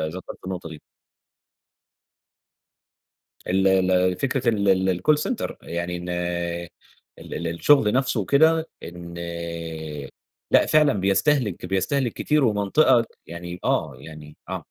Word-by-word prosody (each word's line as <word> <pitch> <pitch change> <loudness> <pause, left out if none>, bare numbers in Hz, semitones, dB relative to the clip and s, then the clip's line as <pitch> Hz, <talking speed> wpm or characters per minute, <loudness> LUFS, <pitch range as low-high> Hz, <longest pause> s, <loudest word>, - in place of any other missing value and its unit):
ذكرت 95 - -8
النقطة 90 -3 -5
دى. 80 -2 -10 2.7
ال 95 +1 +2 0.2
ال 90 0 +3
فكرة 130 -2 0
ال 95 -4 +2
الcall 150 - +4
center 250 - -3
يعني 85 +1 -4
إن 90 +1 -7 1.1
ال - - -9
ال 85 - -3
الشغل 105 - +3
نفسه 130 -3 +1
وكده، 160 - +3
إن 85 0 -9 1.4
لأ، - - +5
فعلًا 150 -2 +4
بيستهلك 100 +2 +1
بيستهلك 115 +7 0
كتير، 150 -2 +1
ومنطقة 110 +3 +3 0.2
يعني 85 +1 -7
آه، 70 -4 0
يعني 75 +1 -12
آه. - - -4
95 Hz, 110 wpm, -24 LUFS, 85-130 Hz, 2.7 s, لأ